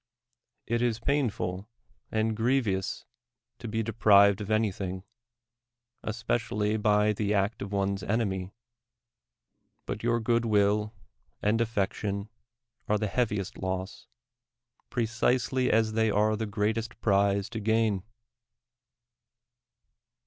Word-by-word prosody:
It 120 +1 0
is 120 -2 +1
painful 110 -8 -1 0.4
and 110 0 0
grievous 115 -5 0 0.5
to - - -7
be 110 +1 -1
de 115 +1 -4
prived 100 -2 +5
of 100 - -6
anything, 95 -4 -1 1.0
especially 110 -2 -1
by 105 0 +3
the 105 0 0
act 100 +3 0
of 100 - -5
one 100 0 0
's - - -10
enemy; 95 -3 -1 1.3
but 100 +2 -4
your 120 0 +1
good 115 +1 +1
will 105 -1 +2 0.5
and 110 +2 +2
affection 100 -2 -2 0.6
are 105 - +2
the 105 - -1
heaviest 105 -3 -1
loss, 95 0 -4 0.8
precisely 125 +2 +1
as 110 -1 +2
they 110 0 +2
are 105 +1 +2
the 110 0 -3
greatest 110 +2 -2
prize 100 -1 +2
to 110 - -4
gain. 110 -2 +1
105 Hz, 110 wpm, -28 LUFS, 100-115 Hz, 1.3 s, prived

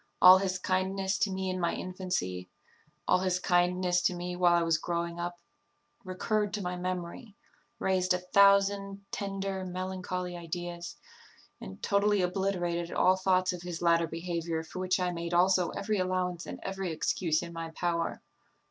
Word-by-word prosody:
All 185 +1 +9
his 190 -1 -1
kindness 190 +1 -1
to 205 - +1
me 190 0 -2
in 185 - -3
my 170 -1 0
infancy, 135 - -3 0.6
all - - +4
his 185 -1 +1
kindness 180 0 +2
to 180 - +1
me 180 0 -4
while 175 -1 +4
I 170 - +3
was 165 -1 +2
growing 170 0 -3
up, 175 0 -4 0.6
recurred 205 +2 -1
to 210 - -4
my 180 0 -2
memory, 180 +4 -5 0.4
raised 185 -1 +1
a 180 - +4
thousand 200 +1 +3
tender, 195 -1 -3
melancholy 185 -1 -4
ideas, 175 0 -6 0.6
and 95 - -10
totally 200 -1 +2
obliterated 175 -2 -1
all 185 - +4
thoughts 185 -1 +2
of 180 - -7
his 175 -2 -5
latter 170 -1 +4
behaviour, 165 -1 -3
for 165 - -8
which 185 0 +1
I 180 -1 0
made 170 0 -3
also 185 0 +4
every 210 0 -2
allowance 180 -2 -1
and - - -7
every 195 -2 -3
excuse 160 0 0
in 170 0 -8
my 165 0 -5
power. 170 0 -2
180 Hz, 160 wpm, -30 LUFS, 175-190 Hz, 0.6 s, All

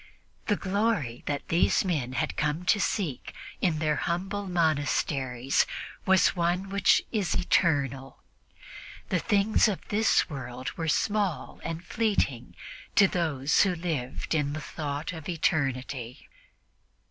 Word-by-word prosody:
The 205 - +3
glory 195 - -1
that 145 -1 -2
these 170 +3 +3
men 145 -9 -1
had 155 +3 -1
come 155 +3 -1
to 205 - +3
seek 175 - -2 0.3
in 170 -4 +2
their 155 -1 0
humble 195 +4 -2
monasteries 145 -6 +1 0.4
was 190 0 +4
one 175 +2 0
which 200 -1 +3
is 205 -6 0
eternal. 135 -7 0 0.9
The 180 - +1
things 205 +4 +3
of 205 -4 -3
this 215 +1 +3
world 130 -2 -6
were 165 -1 -4
small 195 -4 0
and 165 +1 -5
fleeting 180 - -1 0.4
to 200 - +7
those 150 -6 +1
who 190 -3 +2
lived 160 -8 -3
in 145 -2 0
the 155 - -3
thought 150 +1 -4
of 160 -1 -7
eternity. 135 -6 -2
160 Hz, 125 wpm, -28 LUFS, 140-190 Hz, 0.9 s, to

